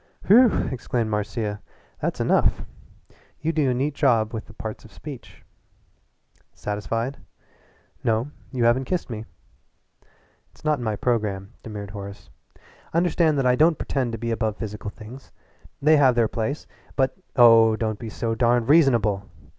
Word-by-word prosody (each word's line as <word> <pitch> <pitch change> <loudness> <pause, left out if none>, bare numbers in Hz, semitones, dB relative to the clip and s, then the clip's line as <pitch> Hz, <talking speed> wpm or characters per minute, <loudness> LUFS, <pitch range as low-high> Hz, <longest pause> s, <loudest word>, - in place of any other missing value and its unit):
"Whew!" 235 +3 +5
exclaimed 120 -3 -2
Marcia. 105 0 -2 0.4
"That's - - -2
enough! - - +2 0.8
You 160 - 0
do 150 -4 +2
a - - +2
neat 140 +4 -1
job 115 -7 +2
with 110 -1 -5
the 110 - -14
parts 110 0 -7
of 110 - -15
speech." 145 -5 -11 1.1
"Satisfied?" 115 +6 -3 0.8
"No, 115 +5 0 0.2
you 125 -3 -1
haven't 120 +3 +3
kissed 180 -6 -2
me." 110 -1 -5 1.2
"It's - - -22
not 150 -2 +2
in - - -5
my 110 -2 -1
programme," 105 -3 -1
demurred 105 -3 -7
Horace. 100 -1 -9 0.6
"Understand 170 -3 +2
that 135 - +1
I 125 0 +4
don't 155 +3 +4
pretend 130 -4 -2
to - - -3
be 115 +1 -3
above 110 -2 -1
physical 105 -2 -5
things. 115 +5 -12 0.5
They 155 +1 +6
have 130 -4 +5
their 115 -2 +3
place, 115 +7 -3 0.3
but 135 -2 +1
" - - -43
"Oh, 115 -1 +7
don't 110 -1 -2
be 115 - -6
so 115 +1 -2
darned 120 +1 +2
reasonable!" 115 -11 +3
115 Hz, 155 wpm, -24 LUFS, 110-135 Hz, 1.2 s, Oh